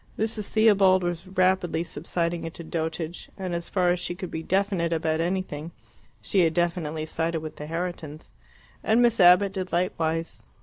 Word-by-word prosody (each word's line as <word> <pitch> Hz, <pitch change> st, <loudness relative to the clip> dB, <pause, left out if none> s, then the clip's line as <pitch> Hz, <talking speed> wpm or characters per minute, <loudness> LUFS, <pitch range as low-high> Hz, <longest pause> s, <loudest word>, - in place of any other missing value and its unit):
Mrs. 220 Hz, -1 st, -2 dB
Theobald 195 Hz, -4 st, +4 dB
was 175 Hz, +1 st, -3 dB
rapidly 185 Hz, -3 st, +1 dB
subsiding 170 Hz, +1 st, -3 dB
into 165 Hz, +1 st, -7 dB
dotage, 160 Hz, +1 st, -4 dB
and, 185 Hz, -3 st, -4 dB
as 170 Hz, 0 st, -3 dB
far 180 Hz, -2 st, +2 dB
as 180 Hz, -, 0 dB
she 175 Hz, 0 st, -4 dB
could 185 Hz, -1 st, -7 dB
be 160 Hz, -, -4 dB
definite 190 Hz, -1 st, 0 dB
about 160 Hz, -1 st, 0 dB
anything, 170 Hz, -3 st, -3 dB, 0.6 s
had 170 Hz, -5 st, +3 dB
definitely 165 Hz, -3 st, -1 dB
sided 165 Hz, 0 st, -1 dB
with 155 Hz, -1 st, -8 dB
the 150 Hz, -, -7 dB
Herritons. 165 Hz, -2 st, -5 dB, 0.5 s
And 230 Hz, +3 st, +4 dB
Miss 235 Hz, -2 st, +3 dB
Abbott 180 Hz, +2 st, +6 dB
did 190 Hz, -1 st, -4 dB
likewise. 165 Hz, -2 st, -1 dB
175 Hz, 160 wpm, -26 LUFS, 165-185 Hz, 0.6 s, Abbott